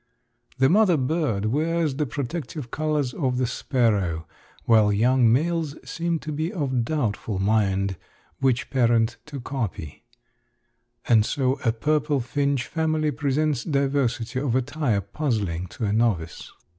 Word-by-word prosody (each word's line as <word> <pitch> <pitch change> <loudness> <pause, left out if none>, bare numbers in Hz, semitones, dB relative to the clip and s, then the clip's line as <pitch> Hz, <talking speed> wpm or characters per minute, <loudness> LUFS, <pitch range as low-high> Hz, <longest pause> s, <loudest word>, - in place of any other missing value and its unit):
The 130 0 +4
mother 185 +1 +4
bird 130 -7 0
wears 155 +5 0
the 150 -1 0
protective 140 0 -5
colors 150 -4 -1
of 130 -6 -1
the 130 - +1
sparrow, 105 -10 0 0.4
while 110 -3 +5
young 120 +3 +4
males 160 +3 0
seem 170 0 -1
to 155 - -5
be 155 +4 -2
of 130 -8 -1
doubtful 115 -7 -2
mind 100 -2 +1 0.4
which 130 -3 +1
parent 120 -3 +2
to 145 -2 -6
copy; 115 - -5 1.0
and 110 -3 +5
so 130 +3 0
a 115 - +3
purple 150 +4 0
finch 140 +1 -1
family 155 0 0
presents 145 -1 0
diversity 135 -4 0
of 130 -3 -1
attire 130 -4 0
puzzling 100 - -2
to 110 +5 -5
a 100 - 0
novice. 105 -8 -1
130 Hz, 130 wpm, -24 LUFS, 115-150 Hz, 1.0 s, while